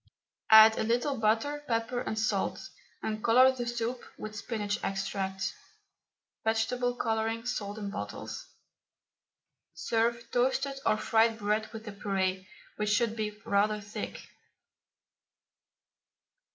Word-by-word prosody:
Add 220 Hz, 0 st, +9 dB
a -, -, +1 dB
little 245 Hz, +4 st, 0 dB
butter, 225 Hz, +7 st, +1 dB
pepper 230 Hz, +1 st, -1 dB
and 220 Hz, -, -3 dB
salt, 220 Hz, -, -1 dB, 0.3 s
and 215 Hz, 0 st, -3 dB
colour 255 Hz, +3 st, +6 dB
the 245 Hz, -2 st, -4 dB
soup 240 Hz, +1 st, -3 dB
with 215 Hz, 0 st, -7 dB
spinach 210 Hz, 0 st, -3 dB
extract 195 Hz, 0 st, -2 dB, 0.9 s
(vegetable 245 Hz, +3 st, 0 dB
colouring, 225 Hz, 0 st, -1 dB
sold 205 Hz, -4 st, -3 dB
in 205 Hz, -2 st, -4 dB
bottles). 210 Hz, -, -6 dB, 1.3 s
Serve 235 Hz, +1 st, 0 dB
toasted 270 Hz, +2 st, +1 dB
or 215 Hz, -, +4 dB
fried 225 Hz, +1 st, +3 dB
bread 215 Hz, 0 st, -1 dB
with 225 Hz, -1 st, -8 dB
the 210 Hz, -, -6 dB
puree, 190 Hz, -2 st, -1 dB, 0.3 s
which 210 Hz, 0 st, 0 dB
should 220 Hz, +1 st, +2 dB
be 210 Hz, -1 st, -4 dB
rather 210 Hz, +1 st, +2 dB
thick. 205 Hz, +1 st, -7 dB
220 Hz, 115 wpm, -30 LUFS, 210-235 Hz, 1.3 s, Add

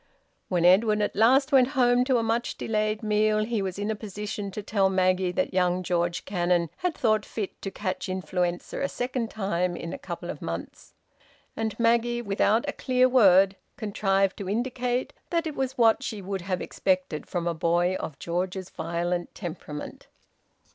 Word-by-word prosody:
When 175 Hz, -2 st, +1 dB
Edwin 210 Hz, +4 st, +5 dB
at -, -, -2 dB
last 265 Hz, +6 st, +4 dB
went 260 Hz, -3 st, +6 dB
home 245 Hz, -1 st, +4 dB
to 260 Hz, -2 st, +3 dB
a 230 Hz, -, +1 dB
much 230 Hz, +1 st, -1 dB
delayed 215 Hz, 0 st, -1 dB
meal, 215 Hz, 0 st, +2 dB
he 225 Hz, -2 st, -1 dB
was 190 Hz, -1 st, -3 dB
in 205 Hz, +2 st, -1 dB
a -, -, -2 dB
position 210 Hz, 0 st, -5 dB
to 205 Hz, +2 st, -6 dB
tell 195 Hz, -2 st, +2 dB
Maggie 185 Hz, -1 st, +2 dB
that -, -, -1 dB
young 180 Hz, 0 st, +1 dB
George 175 Hz, -1 st, -1 dB
Cannon 175 Hz, -3 st, +1 dB
had 360 Hz, -3 st, -1 dB
thought 215 Hz, -3 st, +2 dB
fit 210 Hz, -3 st, -6 dB
to 195 Hz, -, -3 dB
catch 190 Hz, 0 st, -4 dB
influenza 180 Hz, -1 st, -2 dB
a 275 Hz, -, 0 dB
second 245 Hz, -2 st, -2 dB
time 180 Hz, -4 st, -1 dB
in 170 Hz, 0 st, -6 dB
a -, -, -6 dB
couple 285 Hz, -, -6 dB
of -, -, -10 dB
months. -, -, -7 dB, 0.6 s
And 220 Hz, 0 st, -3 dB
Maggie, 235 Hz, +1 st, +2 dB
without 215 Hz, +4 st, +2 dB
a 285 Hz, -, -1 dB
clear 255 Hz, -1 st, +2 dB
word, 195 Hz, -6 st, +5 dB, 0.2 s
contrived 195 Hz, -3 st, +1 dB
to 195 Hz, -2 st, -5 dB
indicate 245 Hz, +3 st, -1 dB, 0.2 s
that 335 Hz, -1 st, 0 dB
it 315 Hz, -, -3 dB
was 265 Hz, -1 st, -3 dB
what 225 Hz, -2 st, +4 dB
she 215 Hz, -, -4 dB
would 195 Hz, 0 st, -4 dB
have 185 Hz, 0 st, -2 dB
expected 185 Hz, -5 st, -1 dB
from 175 Hz, -2 st, -3 dB
a 170 Hz, -, 0 dB
boy 170 Hz, +2 st, +1 dB
of 145 Hz, -, -6 dB
George's 180 Hz, +3 st, -3 dB
violent 175 Hz, +1 st, -3 dB
temperament. 155 Hz, -5 st, -7 dB
200 Hz, 175 wpm, -26 LUFS, 180-230 Hz, 0.6 s, went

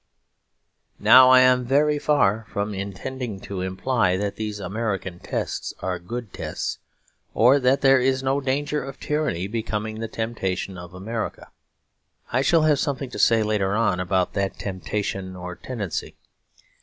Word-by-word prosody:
Now 130 Hz, 0 st, +8 dB
I 130 Hz, 0 st, +8 dB
am 130 Hz, 0 st, +4 dB
very 145 Hz, +4 st, +2 dB
far 115 Hz, -8 st, +2 dB
from 100 Hz, +1 st, -2 dB
intending 100 Hz, +3 st, -5 dB
to 95 Hz, -2 st, -5 dB
imply 95 Hz, +1 st, 0 dB
that 100 Hz, 0 st, -2 dB
these 105 Hz, -1 st, -4 dB
American 95 Hz, -2 st, -3 dB
tests -, -, -4 dB
are 90 Hz, -1 st, -3 dB
good 115 Hz, +4 st, -7 dB
tests, -, -, -4 dB, 0.6 s
or 125 Hz, +5 st, +5 dB
that 130 Hz, +1 st, +2 dB
there 135 Hz, -1 st, +6 dB
is 130 Hz, +1 st, +1 dB
no 135 Hz, +1 st, +1 dB
danger 145 Hz, +2 st, -1 dB
of 135 Hz, 0 st, -8 dB
tyranny 150 Hz, -, -1 dB
becoming 110 Hz, 0 st, -3 dB
the 115 Hz, -, -3 dB
temptation 105 Hz, -4 st, -3 dB
of 90 Hz, 0 st, -10 dB
America. 110 Hz, +4 st, -5 dB, 0.8 s
I 130 Hz, -, +3 dB
shall 160 Hz, +3 st, +3 dB
have 150 Hz, -3 st, +3 dB
something 135 Hz, -4 st, -2 dB
to -, -, -6 dB
say 115 Hz, -1 st, +4 dB
later 105 Hz, -2 st, 0 dB
on 105 Hz, -5 st, +1 dB
about 90 Hz, 0 st, 0 dB
that 100 Hz, -1 st, -2 dB
temptation 95 Hz, -1 st, -4 dB
or 90 Hz, 0 st, -6 dB
tendency. 105 Hz, -7 st, -5 dB
110 Hz, 150 wpm, -24 LUFS, 95-130 Hz, 0.8 s, Now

